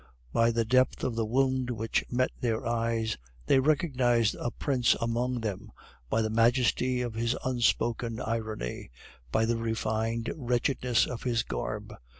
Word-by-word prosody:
By 115 0 +4
the 115 0 +1
depth 130 +3 +2
of 125 - -1
the 115 -1 -1
wound 130 +1 +1
which 115 -2 -1
met 125 +1 +1
their 115 0 -1
eyes, 115 - -1 0.3
they 135 - +4
recognized 130 -6 +2
a 120 - -1
prince 125 -1 +1
among 120 +1 -1
them, 105 -1 -4 0.4
by 110 - +2
the 110 - -1
majesty 125 +2 +2
of 120 -2 -4
his 115 +2 0
unspoken 120 -2 0
irony, 110 - -4 0.4
by 110 +9 +2
the 115 +1 +1
refined 115 0 -1
wretchedness 125 -2 +1
of 125 - -6
his 120 -3 0
garb. - - -4
115 Hz, 150 wpm, -29 LUFS, 115-125 Hz, 0.4 s, By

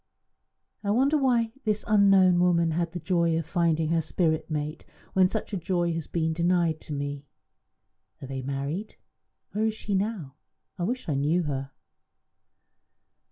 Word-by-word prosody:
I 200 - -2
wonder 265 +8 +3
why 245 -5 +2
this 215 -1 -1
unknown 195 -4 +5
woman 170 -2 +3
had 170 +1 -1
the 175 - -5
joy 170 -2 +1
of 165 - -2
finding 165 -1 +1
her 165 0 +2
spirit 160 0 0
mate 150 0 -3 0.3
when 185 -1 +5
such 215 +2 -4
a - - 0
joy 175 -1 0
has 165 -2 -4
been 160 -1 -1
denied 170 -1 +1
to 150 - -7
me? 145 0 -4 0.9
Are - - -8
they 135 0 -4
married? 140 +9 -4 0.6
Where 215 +1 0
is 220 - -2
she 210 -1 -4
now? 190 -9 -2 0.4
I 175 - 0
wish 250 +5 -3
I 155 - 0
knew 150 +6 +1
her." 135 -3 -3
170 Hz, 160 wpm, -27 LUFS, 155-195 Hz, 0.9 s, unknown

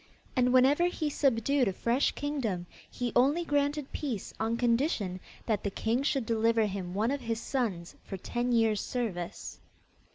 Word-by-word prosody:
And 250 -1 +3
whenever 270 +6 +5
he 315 -4 -1
subdued 270 -1 +2
a 195 - 0
fresh 235 +7 +1
kingdom, 245 -12 -2 0.2
he 245 -1 -3
only 285 +8 +3
granted 290 -1 0
peace 250 -10 -4
on 225 +1 0
condition 235 - +1 0.3
that 215 -4 0
the 200 - 0
king 225 +5 0
should 275 -3 0
deliver 225 0 +2
him 190 -3 -4
one 220 +5 +1
of 280 -1 -2
his 230 -2 -2
sons 220 -11 -2
for 195 - -6
ten 240 +6 -2
years' 225 -3 +3
service. 205 -9 -4
235 Hz, 160 wpm, -30 LUFS, 215-275 Hz, 0.3 s, whenever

